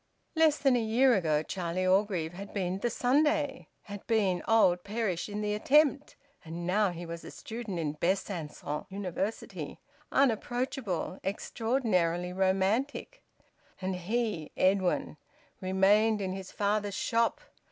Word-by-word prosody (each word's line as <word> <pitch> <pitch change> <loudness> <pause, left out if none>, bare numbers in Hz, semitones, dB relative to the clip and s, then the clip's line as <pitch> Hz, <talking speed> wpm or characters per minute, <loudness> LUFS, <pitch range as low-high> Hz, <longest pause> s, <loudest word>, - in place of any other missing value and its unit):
Less 320 -2 +4
than 270 -2 +3
a 240 - +2
year 240 +4 +4
ago 155 -7 +1
Charlie 185 +1 -2
Orgreave 185 -4 +1
had 200 +4 -9
been 185 -1 -1
`the 240 - 0
Sunday,' 285 +2 +1 0.2
had 205 -1 -9
been 200 -6 +2
`old 180 -6 +4
Perish 205 -4 -2
in 210 +1 -4
the 210 0 -1
attempt,' 285 +6 +3 0.3
and 170 +2 -6
now 200 +3 +2
he 175 0 -6
was 165 0 -7
a - - -8
student 225 -5 -6
in 155 -3 -1
Besancon 160 -3 -3
University, 195 +2 -4 0.3
unapproachable, 240 -6 0
extraordinarily 190 -5 0
romantic; 195 - 0 0.6
and 190 0 -2
he, 200 -3 -2
Edwin, 185 -4 +1 0.4
remained 200 +4 +3
in 190 -2 -2
his 190 -1 -7
father's 205 -1 0
shop! 230 0 +1
200 Hz, 130 wpm, -30 LUFS, 180-230 Hz, 0.6 s, Less